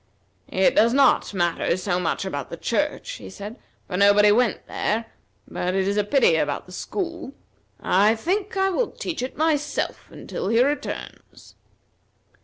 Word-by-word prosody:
"It - - +2
does 235 +3 +4
not 275 -1 +4
matter 175 -2 0
so 180 -1 -1
much 180 +2 -1
about 145 -8 -4
the - - -7
church," - - -1
he 95 - -10
said, 205 - -9 0.3
"for 180 - -4
nobody 205 +1 +6
went 235 -1 +1
there; 225 +2 -1 0.4
but 180 +1 -2
it 190 0 +1
is 200 - 0
a 210 - +2
pity 210 - +3
about 145 -2 -1
the 180 - -15
school. 340 - -5 0.5
I 205 +4 +3
think 390 - -2
I 385 0 +2
will 465 +6 0
teach 330 - -5
it 255 - -5
myself 300 -1 -1
until - - -6
he 230 +3 +3
returns." 290 +2 -5
215 Hz, 160 wpm, -23 LUFS, 190-295 Hz, 0.5 s, nobody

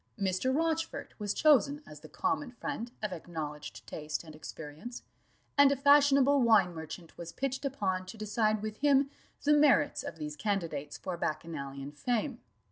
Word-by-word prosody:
Mr. 195 +6 +1
Rochfort 325 +3 -1
was 205 -1 -1
chosen 290 +2 +4
as 150 - -11
the 155 - -13
common 285 - -1
friend 245 -2 -5
of 210 -3 -1
acknowledged 155 -3 -6
taste 150 +1 -4
and 155 -2 -11
experience; 155 +9 -8 0.6
and 285 -1 +8
a - - +3
fashionable 280 0 +5
wine 215 -7 +5
merchant 160 +1 -8
was 170 -1 -6
pitched 270 +5 -3
upon 190 -9 -1
to 190 - -8
decide 215 0 0
with 215 0 -4
him 280 -1 +3 0.3
the 295 +1 +5
merits 295 -2 +4
of - - -6
these 150 -2 -5
candidates 160 -7 -2
for 185 - -4
bacchanalian 140 -4 -4
fame. 240 - -2
210 Hz, 155 wpm, -31 LUFS, -, 0.6 s, and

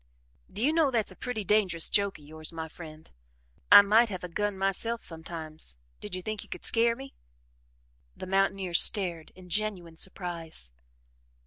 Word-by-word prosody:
"Do 215 - -3
you 300 +4 +3
know 320 -3 +3
that's 225 -6 0
a - - -12
pretty 245 -2 -4
dangerous 190 -5 +3
joke 200 -1 +1
of 150 - -17
yours, 155 +1 -5
my 160 -1 -5
friend 155 -1 -12 0.6
I 205 - +11
might 220 +3 +4
have 185 -3 -6
a - - -3
gun 205 +3 -2
myself 195 +5 -1
sometimes. 160 - -6 0.2
Did 180 - -6
you 185 - -6
think 215 0 -4
you - - -13
could - - -4
scare 230 0 +3
me?" 270 +2 -10 1.0
The - - -6
mountaineer 195 -1 0
stared 170 -3 +3
in 185 0 -14
genuine 185 -6 -3
surprise. 165 - -4
190 Hz, 170 wpm, -28 LUFS, 165-215 Hz, 1.0 s, I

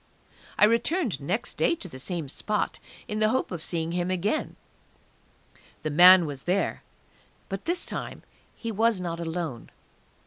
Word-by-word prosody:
I - - +7
returned 235 - +1
next 185 +11 -3
day 340 - +2
to 200 - -8
the 130 -6 -10
same 165 +1 -4
spot, 210 +9 -2 0.3
in 210 - -3
the 215 0 +3
hope 260 +3 0
of 175 -3 -4
seeing 165 0 -2
him 175 +1 -1
again; 185 - -1 1.3
the 155 - -2
man 180 +3 +8
was 140 -3 -7
there, 185 +3 0 0.7
but 195 -1 -5
this 345 +2 0
time - - -5 0.3
he 230 - -5
was 220 -1 +2
not 170 -2 -4
alone. 165 -7 -4
185 Hz, 150 wpm, -27 LUFS, 165-215 Hz, 1.3 s, man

